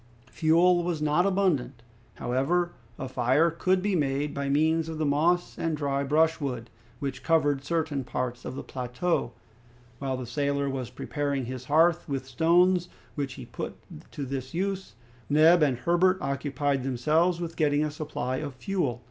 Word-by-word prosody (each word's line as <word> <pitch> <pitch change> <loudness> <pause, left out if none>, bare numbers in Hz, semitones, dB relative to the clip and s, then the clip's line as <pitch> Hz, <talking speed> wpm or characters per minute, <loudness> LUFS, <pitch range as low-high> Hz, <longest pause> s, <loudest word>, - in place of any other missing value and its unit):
Fuel 175 +2 +4
was 170 -2 -1
not 150 +5 +2
abundant. 160 -11 0 0.3
However, 160 +8 0 0.3
a 130 - -4
fire 130 +6 +2
could 185 +3 +1
be 205 -2 +1
made 145 -1 0
by 140 0 -2
means 160 +3 +2
of 160 - -5
the 155 - 0
moss 165 +5 +1
and 165 -2 -1
dry 140 -1 -1
brushwood, 140 -5 0 0.3
which 135 -1 -4
covered 145 -2 +2
certain 155 -3 -1
parts 125 0 -3
of - - -6
the - - -5
plateau. 125 +3 -2 0.7
While 135 -2 -2
the 130 - -5
sailor 140 +3 -1
was 135 -3 -3
preparing 140 -3 -2
his 130 +1 -6
hearth 165 +4 +3
with 135 -2 -2
stones 175 +6 +3 0.2
which 140 -2 -3
he - - -9
put - - -6 0.4
to 145 - -4
this 130 +1 -5
use, 190 - -2 0.3
Neb 160 +4 +6
and 140 -5 +3
Herbert 175 +6 +3
occupied 140 0 -1
themselves 155 +7 +1
with 170 -1 -5
getting 150 -2 +2
a 155 - -1
supply 145 -4 -3
of 135 0 -5
fuel. 130 -4 -2
145 Hz, 160 wpm, -27 LUFS, 135-170 Hz, 0.7 s, Neb